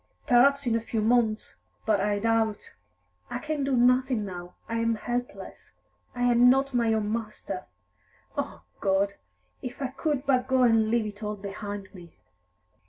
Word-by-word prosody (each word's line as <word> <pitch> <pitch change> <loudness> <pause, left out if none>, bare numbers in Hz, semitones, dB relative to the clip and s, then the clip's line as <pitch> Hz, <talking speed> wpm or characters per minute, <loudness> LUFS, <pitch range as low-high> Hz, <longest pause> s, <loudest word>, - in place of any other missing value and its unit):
"Perhaps 280 +3 +4
in 235 -2 +2
a - - +2
few 225 0 -3
months 220 -1 +1 0.3
but 215 -2 +3
I 205 0 +1
doubt. 225 0 0 0.6
I - - -3
can 310 -2 -3
do 270 -1 +1
nothing 250 -2 +3
now; 180 -2 -8
I 230 - -2
am 230 0 +1
helpless; 245 +3 -5 0.4
I 245 - -2
am 245 0 +6
not 270 +1 +2
my 235 -2 +2
own 215 -1 0
master. 215 -4 -5 0.7
O 85 - -4 0.2
God, 195 +1 +1 0.5
if 250 0 -7
I 270 -2 -2
could 275 +1 -2
but 255 -2 +2
go 260 -1 +3
and 225 -2 +4
leave 230 -1 +2
it 210 0 -7
all 210 0 -3
behind 200 0 -7
me!" 175 -3 -13
230 Hz, 165 wpm, -27 LUFS, 210-250 Hz, 0.7 s, am